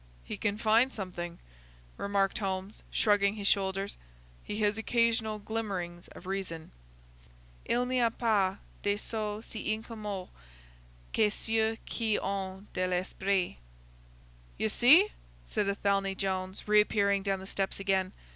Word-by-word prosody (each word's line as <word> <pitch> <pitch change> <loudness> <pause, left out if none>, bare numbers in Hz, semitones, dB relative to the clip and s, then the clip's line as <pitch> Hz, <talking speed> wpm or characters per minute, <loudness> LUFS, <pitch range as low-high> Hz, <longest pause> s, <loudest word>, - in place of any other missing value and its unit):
"He - - -5
can 205 -1 -1
find 225 +4 +4
something," 175 -5 -5 0.6
remarked 200 -1 +1
Holmes, 190 0 -3
shrugging 205 -1 +3
his 200 -2 -2
shoulders. 195 0 +1 0.5
"He 210 - -4
has 210 +1 +2
occasional 225 -1 +2
glimmerings 200 -5 -4
of - - -13
reason. 185 -4 -4 0.9
Il 245 +1 +2
n'y 250 -1 +2
a 230 - +5
pas 205 -5 +1 0.2
des 205 0 +1
sots 215 0 -3
si 215 -1 -3
incommodes 215 -4 -4 0.8
que 215 -1 +4
ceux 225 +1 0
qui 220 -3 0
ont 195 0 -3
de 185 0 0
l'esprit!" 185 - 0 1.0
"You 220 - +1
see!" 305 - +7 0.3
said 210 -2 -1
Athelney 195 -1 +1
Jones, 190 0 -2
reappearing 205 -1 +4
down 195 0 0
the 190 - -8
steps 195 0 -1
again. 190 -1 +1
200 Hz, 130 wpm, -31 LUFS, 190-220 Hz, 1.0 s, see